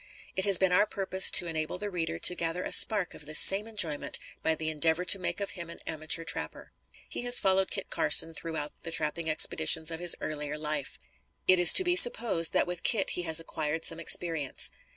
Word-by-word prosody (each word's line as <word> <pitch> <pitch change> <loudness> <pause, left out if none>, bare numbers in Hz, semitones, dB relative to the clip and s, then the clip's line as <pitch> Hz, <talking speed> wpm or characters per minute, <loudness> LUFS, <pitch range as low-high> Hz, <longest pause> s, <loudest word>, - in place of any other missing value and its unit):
It 190 - 0
has 200 -3 +2
been 190 0 0
our 180 +4 +1
purpose 190 -1 +4
to - - +4
enable 160 0 -6
the 205 +1 -7
reader 165 -2 -5
to 175 - +3
gather 170 +1 -5
a - - -7
spark 205 -5 +3
of 150 - -14
this 155 - +3
same 200 +3 +6
enjoyment 170 -10 -4 0.2
by 160 - -2
the 160 0 -7
endeavor 160 +3 -2
to 195 - +6
make 180 - -4
of 200 - -6
him 170 -2 -8
an 170 - -10
amateur 155 +1 -3
trapper. 165 - -8 0.4
He - - -6
has 245 0 +2
followed 190 0 0
Kit 195 - -5
Carson 165 - +2
throughout 160 -3 -7
the - - -9
trapping 160 0 -4
expeditions 160 +1 +1
of 165 - -7
his 175 -1 +1
earlier 150 -1 -6
life. 150 - -6 0.5
It 185 -1 +3
is 175 - +8
to 375 - +4
be 355 -1 -1
supposed 230 - +4
that - - -1
with 175 -1 -8
Kit 215 -6 0
he - - -4
has 160 0 +5
acquired 160 0 -6
some 165 - -1
experience. 165 -3 +1
165 Hz, 215 wpm, -26 LUFS, 160-190 Hz, 0.5 s, is